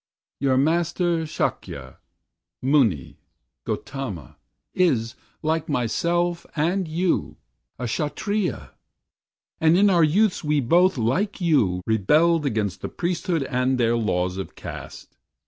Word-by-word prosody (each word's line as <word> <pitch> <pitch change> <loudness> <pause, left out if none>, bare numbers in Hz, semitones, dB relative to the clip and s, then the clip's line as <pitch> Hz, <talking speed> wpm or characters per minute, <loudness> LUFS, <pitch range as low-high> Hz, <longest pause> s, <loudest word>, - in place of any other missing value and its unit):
"Your 135 -2 +2
Master, 165 +2 +1
Sakya, 65 - -4 0.6
Muni, 125 - +1 0.5
Gautama, 125 - -5 0.4
Is, 130 -11 +1 0.3
like 160 0 -1
myself 170 +7 0
and 175 +4 0
you, 170 +3 -1 0.4
a 125 - -4
Kshatriya, 155 - -2 0.9
And 160 +2 +4
in 200 +1 +5
our 170 -3 +4
youths 185 +6 +2
we 150 -1 +1
both, 175 +7 +3
like 150 - 0
you, 125 - +2
rebelled 150 - +3
Against 105 -6 -2
the - - -4
priesthood 170 -2 -1
and 130 0 0
their 120 -1 +2
laws 90 -5 -1
of 95 - -6
caste. - - -9
150 Hz, 110 wpm, -23 LUFS, 115-170 Hz, 0.9 s, in